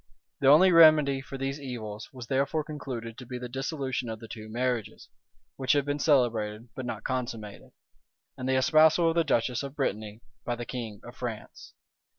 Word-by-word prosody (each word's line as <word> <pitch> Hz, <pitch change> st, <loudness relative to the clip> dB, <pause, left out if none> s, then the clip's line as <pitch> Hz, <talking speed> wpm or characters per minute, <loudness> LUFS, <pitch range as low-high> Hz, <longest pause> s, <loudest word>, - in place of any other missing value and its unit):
The 135 Hz, -, +2 dB
only 165 Hz, +7 st, +7 dB
remedy 155 Hz, -5 st, +6 dB
for 135 Hz, 0 st, -8 dB
these 135 Hz, +2 st, -3 dB
evils 110 Hz, -5 st, -6 dB
was 125 Hz, -3 st, -9 dB
therefore 140 Hz, +5 st, 0 dB
concluded 125 Hz, -7 st, -7 dB
to 125 Hz, -, -9 dB
be 125 Hz, 0 st, -5 dB
the 125 Hz, 0 st, -6 dB
dissolution 135 Hz, -1 st, -3 dB
of 110 Hz, -1 st, -5 dB
the 115 Hz, -, -10 dB
two 110 Hz, 0 st, -9 dB
marriages, 120 Hz, -1 st, -2 dB, 0.5 s
which 135 Hz, +1 st, +2 dB
had 145 Hz, -1 st, +2 dB
been 145 Hz, 0 st, -2 dB
celebrated, 115 Hz, -6 st, +1 dB
but 130 Hz, -2 st, -6 dB
not 110 Hz, -2 st, -5 dB
consummated; 115 Hz, -5 st, -4 dB, 0.7 s
and 130 Hz, +1 st, -4 dB
the 130 Hz, -, +3 dB
espousal 155 Hz, +5 st, +5 dB
of 165 Hz, -, -1 dB
the 170 Hz, -, +3 dB
duchess 125 Hz, -4 st, 0 dB
of 140 Hz, 0 st, -7 dB
Brittany 110 Hz, -5 st, -3 dB, 0.2 s
by 120 Hz, -, -2 dB
the 120 Hz, 0 st, -6 dB
king 115 Hz, -5 st, -6 dB
of 120 Hz, -, -11 dB
France. 115 Hz, -4 st, -7 dB
130 Hz, 180 wpm, -28 LUFS, 115-140 Hz, 0.7 s, only